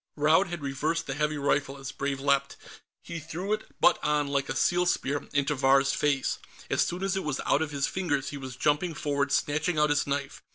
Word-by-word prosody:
Raud 155 +6 +4
had 175 -3 -6
reversed 150 +4 -1
the 135 - -3
heavy 150 +1 -1
rifle 140 -1 0
as 135 -1 -6
Brave 140 0 -3
leaped; 140 0 +1 0.5
he 170 -1 -6
threw 175 +6 -3
it, 215 - -4
butt 265 - +4
on, 150 -1 +1
like 140 -1 -1
a - - -2
seal 175 0 +2
spear, 145 -4 -1
into 145 +1 +1
Vahr's 135 0 +3
face. 140 -2 0 0.3
As - - +2
soon 180 +2 -3
as 195 0 0
it 190 - -1
was 150 -3 -2
out 145 - +3
of 160 - -1
his 140 -2 -1
fingers, 145 -7 -1
he 145 - -6
was 130 -2 -7
jumping 150 +5 +1
forward, 140 -1 -1
snatching 155 +5 +1
out 150 0 +3
his 145 -1 +1
knife. 140 0 -3
145 Hz, 215 wpm, -28 LUFS, 140-160 Hz, 0.5 s, Raud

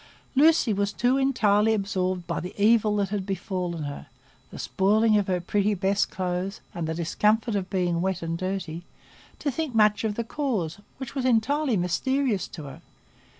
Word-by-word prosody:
Lucy 300 -5 +5
was 200 0 0
too 245 +4 +1
entirely 220 -5 +3
absorbed 185 -3 -1
by - - -2
the 180 - -7
evil 215 0 +4
that 200 -2 0
had 205 -1 -2
befallen 185 -4 -3
her,—the 145 -1 -11
spoiling 215 +3 +2
of 205 -2 +2
her 180 -1 +1
pretty 205 +4 0
best 195 +2 +1
clothes, 185 +1 -3
and 170 -2 -3
the 160 - -2
discomfort 210 +7 +1
of 190 -2 -2
being 175 -3 0
wet 190 -1 -1
and 165 0 -2
dirty,—to 185 - -6
think 300 -3 -3
much 210 -1 +4
of 215 -2 -1
the 235 - -2
cause, 220 - -2 0.2
which 260 -3 -7
was 270 -2 -2
entirely 255 +1 +2
mysterious 235 +5 0
to 160 - -9
her. 135 -2 -10
200 Hz, 165 wpm, -26 LUFS, 180-225 Hz, 0.2 s, Lucy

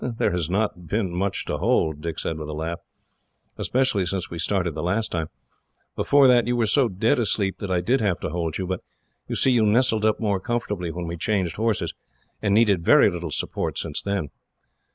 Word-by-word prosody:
"There 120 -2 0
has 85 -3 -1
not 95 -3 -1
been 95 -1 -1
much 95 +2 -1
to - - -3
hold," 80 -1 +1
Dick 85 -1 -4
said 80 -1 -3
with 75 -1 -6
a - - -4
laugh, 80 +2 -3 0.8
"especially 130 -6 +1
since 95 -1 -3
we 85 - -5
started 90 -1 0
the 75 - -4
last 100 +6 -1
time. 80 -2 -2 0.7
Before 140 -1 +5
that, 120 -2 +4
you 120 - +1
were 120 -2 +2
so 130 +4 +3
dead 110 +8 +1
asleep 100 -3 0
that 100 - -5
I 90 -1 +1
did 125 +8 +1
have 100 -5 0
to - - -3
hold 85 -2 -2
you; 95 - -3
but, 95 0 -3 0.5
you - - -3
see, 135 - +3
you 120 -3 +4
nestled 110 0 +3
up 110 0 +2
more 100 -4 0
comfortably 105 -5 -3
when 85 +1 -5
we 85 +1 -5
changed 95 -2 -1
horses, 110 -1 0 0.5
and 105 - 0
needed 105 -6 +3
very - - +6
little 85 -1 -5
support - - -2
since - - -2
then." 100 -7 -2
95 Hz, 210 wpm, -24 LUFS, 85-110 Hz, 0.8 s, very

